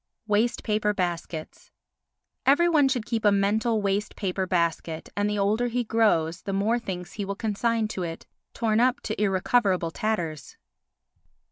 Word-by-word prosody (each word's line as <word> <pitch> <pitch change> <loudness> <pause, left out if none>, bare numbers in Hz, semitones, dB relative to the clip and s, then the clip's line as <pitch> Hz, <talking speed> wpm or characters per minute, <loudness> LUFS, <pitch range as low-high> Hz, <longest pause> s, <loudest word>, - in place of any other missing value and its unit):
Waste 220 +3 +1
Paper 210 -1 0
Baskets 170 -3 -4 0.7
Every 290 +6 +4
one 305 -5 +4
should 250 -4 -1
keep 230 -1 -2
a 205 - +5
mental 210 +2 +1
waste 200 +1 -1
paper 190 -1 -2
basket 170 -2 -1
and 205 0 +1
the 210 - -1
older 210 +5 +1
he 245 +1 -1
grows 185 -7 +1
the 195 - -4
more 215 +5 +1
things 180 -5 -6
he 205 - -4
will 200 0 -3
consign 225 +1 0
to 190 - -4
it—torn 215 +6 -3
up 255 +3 +3
to 215 -1 -4
irrecoverable 190 -3 +2
tatters. 165 -8 -3
210 Hz, 150 wpm, -26 LUFS, 185-225 Hz, 0.7 s, a